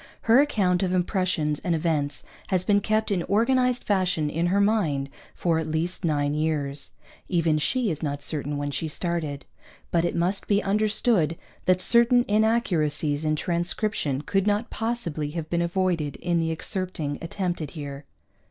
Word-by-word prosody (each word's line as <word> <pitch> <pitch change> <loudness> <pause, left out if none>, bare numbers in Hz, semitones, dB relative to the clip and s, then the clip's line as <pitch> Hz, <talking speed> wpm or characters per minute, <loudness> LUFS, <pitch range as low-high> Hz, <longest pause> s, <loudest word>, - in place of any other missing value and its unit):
Her 230 +3 +5
account 195 -11 +1
of 185 -1 0
impressions 180 -5 0
and 175 -2 0
events 155 -3 0 0.2
has 185 -1 0
been 205 -1 +3
kept 215 +1 0
in 185 -3 +1
organized 250 +6 +2
fashion 180 -7 0
in 165 +3 0
her 195 +3 +2
mind 165 -10 +1 0.2
for 165 -2 +1
at 160 -1 -3
least 165 +4 -2
nine 145 -3 +1
years 150 -2 -1 0.4
(even 165 -4 +2
she 240 - +1
is 155 - -4
not 145 -2 -3
certain 145 -1 -3
when 145 0 -2
she 160 - -2
started), 155 -3 -3 0.5
but 170 -1 +2
it 175 - -1
must 180 +4 -1
be 205 0 +2
understood 205 -4 +2 0.3
that 185 0 +3
certain 235 +5 +5
inaccuracies 170 -9 +1
in 155 0 +1
transcription 170 -3 -1
could 195 +5 0
not 210 +3 0
possibly 225 -11 -2
have 160 -1 -5
been 170 0 +1
avoided 170 -4 0
in 175 -1 -1
the 165 0 0
excerpting 160 -3 -3
attempted 175 -3 -3
here. 140 -1 -7
170 Hz, 160 wpm, -25 LUFS, 155-200 Hz, 0.5 s, Her